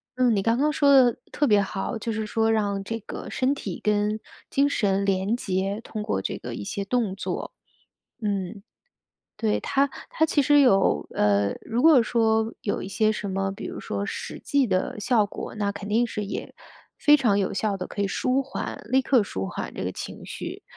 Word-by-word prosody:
嗯， 250 Hz, -2 st, +3 dB
你 200 Hz, -, +2 dB
刚 230 Hz, +3 st, +2 dB
刚 295 Hz, +3 st, +2 dB
说 285 Hz, -1 st, +3 dB
得 260 Hz, -4 st, +6 dB, 0.2 s
特 295 Hz, -, +2 dB
别 210 Hz, -6 st, +5 dB
好， 195 Hz, +4 st, -3 dB
就 225 Hz, +1 st, -3 dB
是 220 Hz, 0 st, -2 dB
说 225 Hz, +1 st, +1 dB
让 205 Hz, -3 st, +1 dB
这 225 Hz, +4 st, -4 dB
个 -, -, -7 dB
身 260 Hz, +2 st, +1 dB
体 200 Hz, -10 st, -6 dB
跟 210 Hz, +1 st, +1 dB, 0.3 s
精 280 Hz, +1 st, +2 dB
神 200 Hz, -6 st, +1 dB
连 195 Hz, +3 st, +1 dB
结， 195 Hz, -1 st, -2 dB
通 215 Hz, -2 st, -6 dB
过 95 Hz, -, -1 dB
这 -, -, -3 dB
个 -, -, -7 dB
一 -, -, -5 dB
些 200 Hz, -, -4 dB
动 230 Hz, -3 st, 0 dB
作。 195 Hz, -, -4 dB, 0.7 s
嗯， 200 Hz, -1 st, -3 dB, 0.7 s
对， 220 Hz, -2 st, +1 dB
它 275 Hz, +1 st, +1 dB, 0.2 s
它 320 Hz, -, +2 dB
其 310 Hz, -, +2 dB
实 290 Hz, +1 st, +5 dB
有， 195 Hz, -, +3 dB
呃， 100 Hz, -1 st, +2 dB
如 235 Hz, +2 st, -1 dB
果 310 Hz, -4 st, +7 dB
说 225 Hz, -1 st, +1 dB
有 205 Hz, -, -1 dB
一 -, -, -5 dB
些 215 Hz, +2 st, +2 dB
什 210 Hz, -1 st, -3 dB
么 195 Hz, 0 st, -1 dB
比 195 Hz, -, -8 dB
如 -, -, -6 dB
说 100 Hz, 0 st, -3 dB
实 -, -, -5 dB
际 280 Hz, -4 st, +1 dB
的 185 Hz, +2 st, -1 dB
效 225 Hz, -2 st, +3 dB
果， 205 Hz, -, -7 dB
那 205 Hz, -1 st, 0 dB
肯 200 Hz, 0 st, -7 dB
定 230 Hz, +3 st, +2 dB
是 210 Hz, -2 st, -4 dB
也， 195 Hz, -, -6 dB, 0.4 s
非 295 Hz, 0 st, +6 dB
常 230 Hz, -8 st, +2 dB
有 195 Hz, -, 0 dB
效 205 Hz, 0 st, 0 dB
地 185 Hz, -, -4 dB
可 -, -, -5 dB
以 -, -, +1 dB
舒 255 Hz, +7 st, +1 dB
缓， 275 Hz, -, -5 dB
立 265 Hz, -, +4 dB
刻 255 Hz, -3 st, +4 dB
舒 95 Hz, -, -4 dB
缓 -, -, -5 dB
这 -, -, -5 dB
个 -, -, -1 dB
情 -, -, -7 dB
绪， -, -, -6 dB
215 Hz, 220 characters per minute, -25 LUFS, 195-245 Hz, 0.7 s, 果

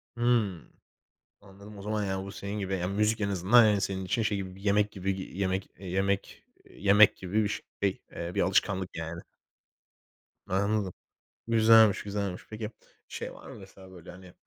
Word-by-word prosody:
Hıı. 115 Hz, -8 st, +1 dB, 0.8 s
Anladım. 100 Hz, +1 st, -14 dB
O -, -, -9 dB
zaman 105 Hz, 0 st, -2 dB
ya 95 Hz, -1 st, -2 dB
bu 100 Hz, -, -8 dB
senin 100 Hz, +1 st, -5 dB
gibi, 95 Hz, -1 st, -2 dB
ya 90 Hz, 0 st, -2 dB
müzik 105 Hz, +3 st, +1 dB
en 100 Hz, -, 0 dB
azından 100 Hz, +5 st, +5 dB
yani 105 Hz, -2 st, +3 dB
senin 95 Hz, -1 st, -2 dB
için 115 Hz, +5 st, 0 dB
şey 105 Hz, -2 st, 0 dB
gibi, 95 Hz, -1 st, -6 dB
bir -, -, -14 dB
yemek 105 Hz, +1 st, +2 dB
gibi 95 Hz, 0 st, -3 dB
y 95 Hz, -, -8 dB
yemek 95 Hz, -1 st, -1 dB
yemek 95 Hz, +1 st, -2 dB, 0.3 s
yemek 100 Hz, +2 st, +5 dB
gibi 100 Hz, +4 st, -1 dB
bir 100 Hz, -, 0 dB, 0.3 s
şey, 100 Hz, -2 st, 0 dB
eee, 85 Hz, +1 st, -5 dB
bir -, -, +1 dB
alışkanlık 95 Hz, -1 st, +1 dB
yani. 80 Hz, +1 st, -5 dB, 1.2 s
Anladım. 100 Hz, 0 st, 0 dB, 0.5 s
Güzelmiş, 110 Hz, -2 st, +6 dB
güzelmiş. 100 Hz, -3 st, -3 dB
Peki 110 Hz, -1 st, -5 dB, 0.4 s
şey -, -, -6 dB
var -, -, -13 dB
mı -, -, -9 dB
mesela 95 Hz, -1 st, -14 dB
böyle 90 Hz, -1 st, -12 dB
hani, 90 Hz, 0 st, -14 dB
100 Hz, 170 wpm, -29 LUFS, 95-105 Hz, 1.2 s, Güzelmiş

